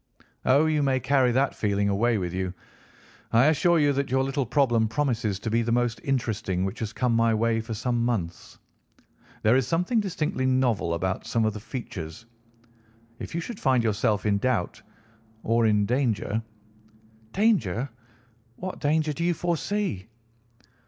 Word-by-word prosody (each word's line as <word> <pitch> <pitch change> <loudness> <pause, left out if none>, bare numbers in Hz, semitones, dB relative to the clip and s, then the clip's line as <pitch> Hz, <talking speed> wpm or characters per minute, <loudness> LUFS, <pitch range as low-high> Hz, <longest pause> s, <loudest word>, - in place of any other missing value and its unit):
"Oh, 140 +4 +4
you 155 -1 +1
may 135 -2 +2
carry 130 -1 +2
that 135 +3 +1
feeling 100 -1 0
away 110 +4 +2
with 90 -3 -3
you. 95 0 -3 0.8
I 115 +3 +5
assure 170 +3 +3
you 145 -2 +3
that 140 0 -1
your 130 +1 +2
little 135 -1 -1
problem 120 -4 +2
promises 115 -5 -1
to 110 +3 -4
be 115 +1 +2
the 115 0 -1
most 120 -1 0
interesting 110 -8 -1
which 95 - -5
has 110 -2 -3
come 125 0 0
my 115 -1 +3
way 115 0 +1
for 110 0 -5
some 120 +2 -1
months. 100 -9 -3 0.9
There 110 +3 +5
is 130 -1 +2
something 180 - +1
distinctly 165 -8 -1
novel 125 -10 +1
about 95 +2 -3
some 115 -1 +1
of 110 - 0
the 105 - -6
features. 100 - -7 0.9
If - - -7
you 170 - -1
should 220 +4 -7
find 130 -4 +2
yourself 105 -1 0
in 100 -1 +2
doubt 130 +1 -1 0.6
or 115 0 +2
in 105 -1 +3
danger—" 115 -3 0 0.9
"Danger! 175 - +1 0.7
What 185 +6 -6
danger 155 +1 +1
do 170 - -4
you 175 0 +1
foresee?" 175 - -2
120 Hz, 160 wpm, -26 LUFS, 110-140 Hz, 0.9 s, I